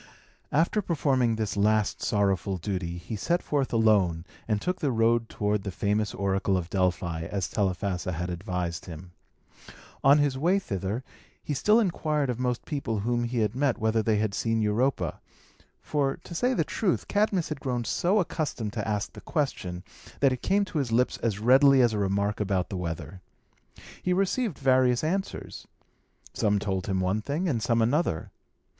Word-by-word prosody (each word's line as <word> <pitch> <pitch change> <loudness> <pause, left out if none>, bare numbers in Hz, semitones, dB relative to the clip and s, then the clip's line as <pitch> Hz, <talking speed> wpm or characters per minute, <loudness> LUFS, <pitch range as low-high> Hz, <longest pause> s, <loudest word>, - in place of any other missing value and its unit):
After 170 +8 +2
performing 135 - +1
this 110 -3 -2
last 105 +1 +1
sorrowful 100 -2 +1
duty, 90 -2 -3
he 90 +5 -6
set 175 - 0
forth 140 -3 -1
alone, 100 -7 +3 0.2
and 105 -2 +1
took 180 - -2
the 150 - 0
road 115 0 +2
toward 105 0 -1
the 100 - -4
famous 105 +2 -1
oracle 95 0 +1
of 85 -1 -4
Delphi, 90 -3 0
as 95 -3 -2
Telephassa 95 -2 -1
had 90 +2 -3
advised 85 -1 -3
him. 85 +1 -9 0.9
On 140 +2 +7
his 145 -3 +1
way 175 +6 +3
thither, 100 - -3 0.4
he 150 - -2
still 210 - +4
inquired 155 - 0
of 120 - -5
most 125 -1 -1
people 125 -8 -2
whom 120 +2 0
he 115 -2 +1
met 135 0 +1
whether 110 0 +1
they 110 0 +1
had 105 -1 0
seen 115 +1 0
Europa; 110 +6 0 0.6
for, 140 -2 0
to - - -9
say 250 +9 +1
the - - +2
truth, 195 -5 -1
Cadmus 205 -4 +1
had 155 - -4
grown 125 -3 -2
so 180 - +1
accustomed 135 - -2
to 110 -2 -3
ask 105 -1 -2
the - - -10
question, 90 - -2 0.4
that 135 -2 +4
it 125 - -6
came 200 +1 +2
to 165 - -3
his 130 -5 -2
lips 125 +3 +2
as 110 -4 -1
readily 135 +5 +6
as 120 -3 +4
a 105 - -1
remark 100 +1 0
about 95 -3 0
the - - -4
weather. 90 +2 -5 0.8
He 180 - +1
received 195 - 0
various 130 -2 +3
answers. 190 +5 -3 0.7
Some 105 -1 +1
told 95 -2 -2
him 95 -2 0
one 95 +4 0
thing, 150 - -2
and 125 -9 0
some 115 0 +2
another. 120 - 0
115 Hz, 175 wpm, -27 LUFS, 100-140 Hz, 0.9 s, On